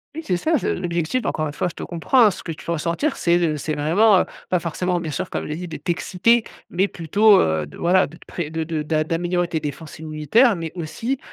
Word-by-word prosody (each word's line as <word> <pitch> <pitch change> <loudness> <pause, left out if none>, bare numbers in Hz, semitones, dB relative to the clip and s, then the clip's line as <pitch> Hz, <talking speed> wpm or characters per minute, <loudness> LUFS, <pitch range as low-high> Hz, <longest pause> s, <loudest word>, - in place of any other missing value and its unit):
Oui, 320 - -5
c'est 180 - +1
ça, 315 - +1
c'est - - -1
l'objectif, 175 +7 -1
encore 155 - -1
une 145 - -4
fois, 165 - -1
je 175 - -7
te - - -6
comprends, 180 +9 +2
hein. 210 - +5
Ce - - -8
que - - -5
tu 155 - -9
peux - - -2
ressentir, 170 - -1
c'est, 170 0 +2
heu, 165 -3 +1
c'est 155 +1 -3
vraiment 185 +7 +4
heu, - - -1 0.2
pas 180 - +2
forcément, 175 +2 -1
bien 165 -2 -4
sûr, 135 - -3
comme - - -3
je - - -7
l'ai 150 - -2
dit, 180 +2 -6
de 160 - -6
t'exciter, 190 +6 +1 0.3
mais 190 +3 +2
plutôt, 200 +5 +4
heu, 80 -2 +1
de 75 - -13
voilà, 185 +2 +3
de 160 - -14
te - - -19
pré 170 -4 -5
de 160 +1 -2
de 160 -1 -3
d'a 155 +1 0
d'améliorer 175 +2 -1
tes 165 -2 -2
défenses 150 +1 -7
immunitaires. 160 - +3
Mais 165 -2 -5
aussi 225 - -3
170 Hz, 260 wpm, -22 LUFS, 155-185 Hz, 0.3 s, hein